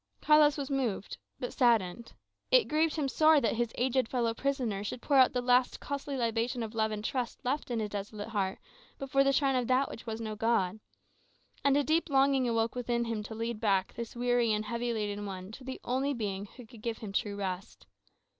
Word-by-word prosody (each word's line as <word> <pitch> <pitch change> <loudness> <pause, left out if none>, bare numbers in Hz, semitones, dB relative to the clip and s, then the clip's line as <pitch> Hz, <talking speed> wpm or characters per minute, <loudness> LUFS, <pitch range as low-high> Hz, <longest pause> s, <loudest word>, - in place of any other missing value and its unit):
Carlos 300 -1 +5
was 280 -1 -4
moved, 240 -8 -2 0.2
but 250 - -4
saddened. 230 -3 +1 0.4
It - - +6
grieved 310 +1 +1
him 300 -3 0
sore 310 +2 +5
that 230 -6 +1
his 235 0 -1
aged 255 0 +1
fellow 235 -3 0
prisoner 245 -6 -1
should 210 - -4
pour 280 +3 +2
out 260 -1 +7
the 250 -1 -2
last 250 0 +3
costly 280 0 -4
libation 235 +1 -1
of 220 0 -6
love 220 -1 +1
and 215 0 -5
trust 250 -2 -3
left 275 +3 -1
in 235 -2 -1
his 210 -2 -3
desolated 205 +2 -5
heart 195 -3 -1 0.4
before 275 0 +2
the 275 - +3
shrine 275 -1 +2
of 250 -2 0
that 260 +2 +2
which 230 - -10
was 220 0 -3
no 215 -2 -4
god. 215 -3 +1 0.8
And 280 0 +4
a 290 - +3
great 320 +3 +1
longing 270 -2 +3
awoke 230 0 +1
within 240 -1 -1
him 225 -2 -2
to 215 +1 -7
lead 230 0 -3
back 195 -4 +1
this 235 0 -6
weary 245 -1 +2
and 215 0 0
heavy 235 +2 -2
laden 205 -2 -3
one 190 0 -7
to 255 - -11
the 260 0 -6
only 270 +3 0
Being 200 -3 -3
who 245 +4 -13
could 220 0 -15
give 230 0 -3
him 205 -3 -7
true 205 0 -1
rest. 190 -1 -5
235 Hz, 210 wpm, -30 LUFS, 215-265 Hz, 0.8 s, out